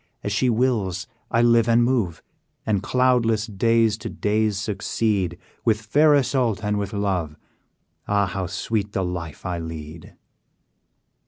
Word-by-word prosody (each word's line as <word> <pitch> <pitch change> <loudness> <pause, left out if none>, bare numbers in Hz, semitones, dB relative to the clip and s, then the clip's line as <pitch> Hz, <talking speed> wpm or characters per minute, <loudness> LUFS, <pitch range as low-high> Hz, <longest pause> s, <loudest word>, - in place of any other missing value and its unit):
As 100 - -2
she 125 +5 +2
wills, 110 -7 0 0.2
I 115 - +2
live 115 -1 +4
and 115 +1 +5
move, 115 -10 0 0.4
And 105 -3 +1
cloudless 120 -2 +2
days 110 +1 +2
to - - -5
days 105 -1 0
succeed: 100 -3 -1 0.3
With 110 -2 +2
fair 145 +8 +4
Isoude, 125 -6 +1
and 105 0 0
with 100 -1 -3
love, 95 -7 -1 0.7
Ah! 100 0 +2
how 95 -1 -3
sweet 105 +2 -2
the 95 - 0
life 85 -3 -6
I 90 -2 -2
lead! 80 -1 -8
105 Hz, 140 wpm, -23 LUFS, 95-115 Hz, 0.7 s, and